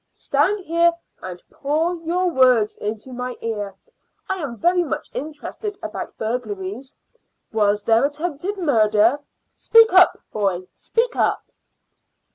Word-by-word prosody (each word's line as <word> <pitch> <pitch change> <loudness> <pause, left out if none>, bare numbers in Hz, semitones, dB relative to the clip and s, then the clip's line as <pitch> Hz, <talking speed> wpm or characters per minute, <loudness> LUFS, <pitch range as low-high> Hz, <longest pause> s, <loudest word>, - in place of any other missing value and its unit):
Stand 410 -2 0
here 335 +1 +3 0.3
and 180 -1 -8
pour 310 +5 0
your 340 +3 -1
words 255 -7 +4
into 215 +4 -5
my 250 0 -4
ear. 205 -4 -4 0.5
I 380 - -1
am 255 -6 -5
very 355 +7 +3
much 305 - -4
interested 315 +8 -6
about - - -6
burglaries. 220 +1 -4 0.6
Was 205 -1 +2
there 225 +2 +3
attempted 315 +6 -3
murder? 225 - +3 0.3
Speak 455 -3 +5
up, 370 -1 +6 0.2
boy 190 -4 -1
speak 475 +1 -1
up." - - +1
260 Hz, 120 wpm, -22 LUFS, 215-340 Hz, 0.6 s, up